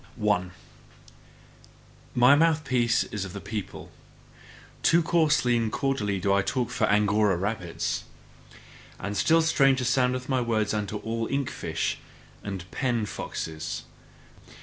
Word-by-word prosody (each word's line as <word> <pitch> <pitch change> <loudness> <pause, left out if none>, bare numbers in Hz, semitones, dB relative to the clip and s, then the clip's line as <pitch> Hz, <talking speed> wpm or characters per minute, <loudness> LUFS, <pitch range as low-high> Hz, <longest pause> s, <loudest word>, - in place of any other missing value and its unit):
1. 100 -5 0 1.6
My 125 +3 +7
mouthpiece 140 -7 +2
is 105 -2 -5
of 95 -2 -7
the 100 - -5
people: 105 -1 -6 0.9
too 170 +1 +4
coarsely 155 -7 +3
and 115 -2 0
cordially 105 -9 -1
do 100 +2 +1
I 100 - +3
talk 125 +3 -2
for - - +1
Angora 105 -2 +3
rabbits. 90 -3 -3 0.9
And 100 +2 -4
still 165 +10 +4
stranger 135 -5 +3
soundeth 125 0 +1
my 130 -2 +1
word 110 -3 0
unto 105 -1 -2
all 115 +1 -3
ink 140 -1 -1
fish - - -3 0.4
and 95 -3 -5
pen 120 -5 0
foxes. 80 -5 -5
115 Hz, 125 wpm, -26 LUFS, 100-130 Hz, 1.6 s, My